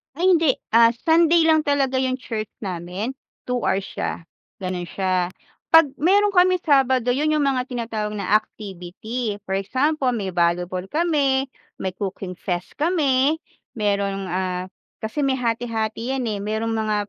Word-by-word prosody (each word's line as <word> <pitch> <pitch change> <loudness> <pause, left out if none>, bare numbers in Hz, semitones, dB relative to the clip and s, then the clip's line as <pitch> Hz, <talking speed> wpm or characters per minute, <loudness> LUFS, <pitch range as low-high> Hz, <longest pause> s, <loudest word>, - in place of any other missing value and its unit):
Ay, 365 +4 +3
hindi. 320 -6 +4 0.2
Ah, 230 +1 +6
Sunday 330 +1 +5
lang 320 -1 +5
talaga 280 -3 +1
yung 260 -1 0
church 225 -4 -5 0.2
namin, 185 +5 -4 0.3
2 250 0 -1
hours 195 -2 0
siya - - -4 0.4
gano'n 180 -1 -3
siya. 185 -1 0 0.4
'Pag 325 -4 +6
meron 400 +6 +4
kaming 365 -1 +3
Sabado 260 -4 +3
yon, 285 +5 +1
yung 300 - +2
mga 265 -2 0
tinatawag 225 -4 -3
na 200 -1 -3
activity 210 +3 -6
for 190 - -8
example 265 +8 0
may 195 -4 -3
volleyball 175 +1 0
kami, 280 - +1 0.2
may 190 - -3
cooking 190 0 -5
fest 180 -1 -3
kami, 295 -3 +2 0.4
merong, 200 -2 0
ah, 185 0 -1 0.4
kasi 220 +7 -3
may 270 -2 +2
hati-hati 230 0 -2
yan 260 - -2
eh, 205 - -3
merong 220 +2 -2
mga 220 -1 0
235 Hz, 150 wpm, -22 LUFS, 195-285 Hz, 0.4 s, Ah